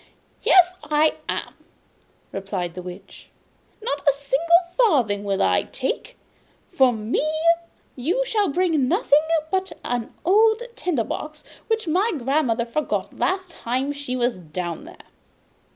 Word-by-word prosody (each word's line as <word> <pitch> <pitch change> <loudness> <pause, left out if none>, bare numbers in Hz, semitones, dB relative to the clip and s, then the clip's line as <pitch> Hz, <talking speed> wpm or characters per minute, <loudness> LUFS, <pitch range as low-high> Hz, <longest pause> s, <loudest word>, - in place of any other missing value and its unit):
'Yes, 365 0 +5
I 300 +1 +2
am!' - - -3 0.8
replied 195 -3 -4
the 180 - -6
Witch. 180 0 -11 0.5
'Not 290 -10 -2
a - - +4
single 285 +5 +3 0.2
farthing 250 - +3
will 195 -1 0
I - - +3
take! - - -3 0.5
For 260 -2 +4
me 220 +4 -1 0.7
you 345 - 0
shall 420 -6 +1
bring 320 -4 +1
nothing 310 - +4 0.3
but 380 0 0
an 240 -2 -2
old 440 +5 +4
tinder 305 -11 0
box 305 +7 -6 0.2
which 445 -4 -1
my 385 +8 +2
grandmother 260 -3 +1
forgot 290 +6 -3
last 375 -1 0
time 260 0 -2
she 285 -3 -4
was 245 -3 0
down 170 0 -5
there. - - -12
285 Hz, 130 wpm, -23 LUFS, 235-365 Hz, 0.8 s, Yes